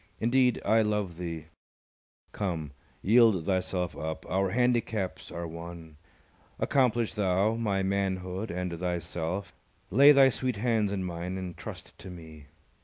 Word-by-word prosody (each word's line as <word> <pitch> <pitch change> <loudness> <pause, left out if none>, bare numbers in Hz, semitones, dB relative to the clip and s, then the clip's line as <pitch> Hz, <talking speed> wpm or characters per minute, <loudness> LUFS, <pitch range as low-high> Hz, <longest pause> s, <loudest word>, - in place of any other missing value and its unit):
Indeed, 125 +1 +3
I 110 +1 +4
love 105 -5 -1
thee: 85 -3 -5 0.9
come, 85 -8 -3 0.3
Yield 110 -5 +5
thyself 95 -1 -1
up: 80 0 -5
our 95 +1 +1
handicaps 115 -3 0
are 85 0 -5
one; 85 -1 -9 0.6
Accomplish 120 -4 +2
thou 100 0 +2
my 105 -4 0
manhood 95 +1 -2
and 90 0 -3
thyself; 90 +1 -3 0.4
Lay 140 +8 +8
thy 135 -2 +7
sweet 130 -1 -2
hands 110 -2 +1
in 100 -2 -2
mine 90 +1 -4
and 90 -2 -5
trust 90 - -9
to 95 +3 -9
me. 80 -5 -11
95 Hz, 130 wpm, -29 LUFS, 85-110 Hz, 0.9 s, Lay